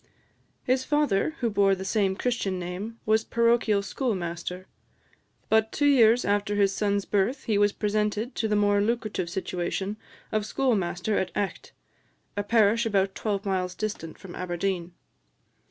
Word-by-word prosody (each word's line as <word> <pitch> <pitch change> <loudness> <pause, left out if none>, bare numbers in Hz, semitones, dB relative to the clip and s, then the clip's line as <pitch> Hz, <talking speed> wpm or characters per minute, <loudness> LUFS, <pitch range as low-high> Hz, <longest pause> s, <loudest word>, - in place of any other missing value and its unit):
His 255 +1 +1
father, 295 -1 +1
who 235 -2 +1
bore 200 -1 +3
the 190 0 -7
same 195 -2 +1
Christian 200 -4 -1
name, 180 +6 -5
was 220 +1 +3
parochial 230 -3 +2
schoolmaster; 185 -5 -3 0.8
but 220 0 +3
two 290 - 0
years 245 -4 +5
after 205 0 +1
his 200 -1 +3
son's 200 -1 0
birth, 210 +7 0
he 220 - 0
was 205 0 +4
presented 210 +3 -1
to 225 - -1
the 210 - +1
more 205 0 +3
lucrative 215 -5 -1
situation 190 +2 -3 0.3
of 215 -1 0
schoolmaster 210 -5 0
of 190 - -1
Echt, 200 -1 -3 0.6
a 205 - 0
parish 225 +2 +3
about 195 -2 +1
twelve 205 -1 -2
miles 185 -2 -1
distant 210 -7 -5
from 185 -3 -11
Aberdeen. 180 -1 -3
205 Hz, 145 wpm, -26 LUFS, 190-225 Hz, 0.8 s, years